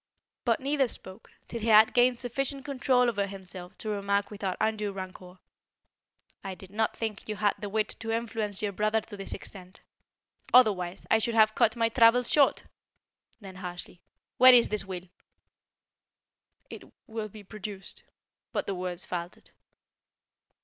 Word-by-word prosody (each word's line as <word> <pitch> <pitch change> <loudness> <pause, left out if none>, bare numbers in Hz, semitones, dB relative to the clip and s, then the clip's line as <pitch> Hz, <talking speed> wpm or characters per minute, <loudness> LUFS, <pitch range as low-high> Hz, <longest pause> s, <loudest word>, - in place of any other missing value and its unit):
But 230 -2 +2
neither 275 0 +1
spoke, 190 -4 -10 0.2
till 235 - -5
he 225 - -4
had 220 0 +7
gained 245 0 +4
sufficient 270 +3 -3
control 255 -3 +2
over 205 -4 0
himself 185 -1 -9
to 215 - -5
remark 200 0 -1
without 200 -3 -3
undue 215 -2 0
rancour: 185 -1 -9 1.1
"I 195 -1 -5
did 190 +1 -14
not 220 +1 -1
think 220 -2 -5
you 215 - -2
had 205 -1 +2
the 205 - -5
wit 215 +1 0
to 225 - -6
influence 225 -3 -2
your 205 - 0
brother 215 +3 +1
to 215 0 -10
this 195 -1 -6
extent; 185 -1 -9 0.7
otherwise, 195 -7 +4
I 225 - +5
should 230 +1 -1
have 215 -1 +5
cut 220 +1 +2
my 230 -1 +1
travels 230 +1 +4
short." 285 -3 +4 0.8
Then 190 -2 -10
harshly: 180 -1 -8 0.4
"Where 255 0 +9
is 235 - +5
this 210 -1 -1
will?" 185 -1 -7 1.6
"It - - -9 0.2
will 220 -1 -5
be 210 +1 -12
produced." 200 -1 -8 0.5
But - - -1
the 195 - -2
words 180 -1 -4
faltered. 175 0 -6
210 Hz, 155 wpm, -28 LUFS, 190-230 Hz, 1.6 s, Where